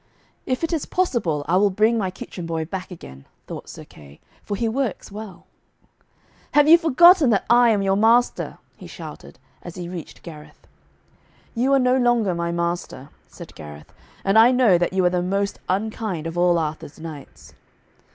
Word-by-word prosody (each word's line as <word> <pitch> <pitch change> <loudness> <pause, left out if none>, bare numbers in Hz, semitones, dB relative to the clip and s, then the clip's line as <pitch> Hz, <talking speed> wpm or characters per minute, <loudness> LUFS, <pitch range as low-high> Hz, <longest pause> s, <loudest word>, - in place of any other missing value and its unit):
'If 255 +4 -2
it 330 - -1
is 315 - -2
possible, 205 - -1
I 175 +3 +2
will 205 +1 +3
bring 215 +4 +2
my 200 -5 -1
kitchen 180 -1 -8
boy 165 -1 -3
boy - - -20
back 190 -1 -5
again,' 70 - -12 0.2
thought - - -9
Sir - - -10
Kay, 70 -1 -17 0.2
'for 205 - -5
he 230 +3 -1
works 235 -4 -3
well.' 210 -3 -10 1.1
'Have 295 0 +5
you 335 +2 +8
forgotten 330 -1 +5
that 205 -4 +1
I 240 0 +6
am 205 -3 +1
your 195 0 +1
master?' 230 +4 +2 0.2
he - - -12
shouted, - - -11 0.2
as 175 - -10
he 175 -1 -6
reached 175 -2 -9
Gareth. 155 -3 -13 0.9
'You 255 +3 0
are - - +5
no 250 0 +2
longer 240 -6 +2
my 170 0 -3
master,' 170 -5 -4 0.2
said - - -12
Gareth, 75 -1 -12 0.3
'and 195 +3 +4
I 230 +2 +7
know 245 -8 +4
that 175 - 0
you 185 -1 +1
are 180 - +3
the 180 -1 0
most 200 +2 -2
unkind 200 -3 -3
of 165 0 -5
all 175 0 +3
Arthur's 155 -2 -5
knights.' 160 -3 -11
195 Hz, 180 wpm, -22 LUFS, 170-235 Hz, 1.1 s, you